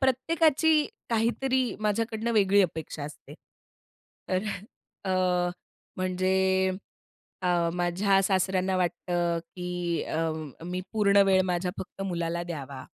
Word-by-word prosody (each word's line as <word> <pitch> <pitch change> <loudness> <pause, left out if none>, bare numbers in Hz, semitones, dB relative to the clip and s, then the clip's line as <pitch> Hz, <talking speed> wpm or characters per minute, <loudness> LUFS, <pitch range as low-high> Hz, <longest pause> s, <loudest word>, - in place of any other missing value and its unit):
प्रत्येकाची 305 +3 +3 0.2
काहीतरी 250 +3 +1
माझ्याकडनं 225 +2 0
वेगळी 200 -1 +4
अपेक्षा 160 -4 -4
असते. 150 - -10 0.9
तर 185 +1 +1 0.7
अ, - - +2 0.8
म्हणजे 190 +1 +1 0.7
अ, 175 -2 +2
माझ्या 185 +3 +2
सासऱ्यांना 190 -1 +1
वाटतं, 175 -1 0 0.2
की 180 -1 -2
अ, 160 0 -1 0.3
मी 180 +1 -3
पूर्ण 200 -2 +3
वेळ 190 -1 +5
माझ्या 180 0 -1
फक्त 195 - -6
मुलाला 170 -2 -2
द्यावा. 140 -6 -6
185 Hz, 100 wpm, -28 LUFS, 175-210 Hz, 0.9 s, वेळ